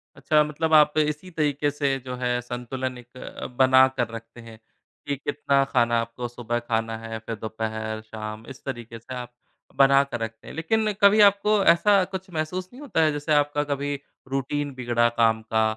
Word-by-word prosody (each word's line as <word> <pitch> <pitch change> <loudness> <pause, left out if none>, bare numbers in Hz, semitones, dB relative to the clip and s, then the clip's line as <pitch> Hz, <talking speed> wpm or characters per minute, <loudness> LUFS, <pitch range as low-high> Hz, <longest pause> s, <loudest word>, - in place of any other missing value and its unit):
अच्छा, 150 -1 +3
मतलब 160 +2 -2
आप 150 0 +6
इसी 150 +3 0
तरीके 145 -2 0
से 140 -2 0
जो 125 -1 -4
है, 125 -1 -1
संतुलन 125 +1 -5
एक 125 +1 -15
अ, - - -8
बनाकर 130 -1 +4
रखते 115 +1 -9
हैं 115 -1 -12 0.5
कि 145 - 0
कितना 140 0 +1
खाना 120 -3 +2
आपको 115 +1 -5
सुबह 120 0 -3
खाना 115 -1 -2
है, 115 0 -6
फिर 110 +1 -6
दोपहर, 110 0 -4
शाम 110 0 -8
इस - - -20
तरीके 120 -3 -6
से 125 +3 -10
आप 125 -1 -7 0.5
बनाकर 140 -2 +4
रखते 115 0 -6
हैं, - - -8
लेकिन 215 +7 +1
कभी 205 +1 +6
आपको 200 +1 +1
ऐसा 200 +3 +3
कुछ 190 +1 -6
महसूस 175 +4 -3
नहीं 260 - -12
होता 255 - 0
है, 155 - +3
जैसे 145 +1 -1
आपका 145 0 +2
कभी 145 +1 -1 0.4
रूटीन 140 +1 -2
बिगड़ा 120 -2 +1
काम 110 -1 +3
का 110 0 +4
130 Hz, 180 wpm, -25 LUFS, 115-150 Hz, 0.5 s, आप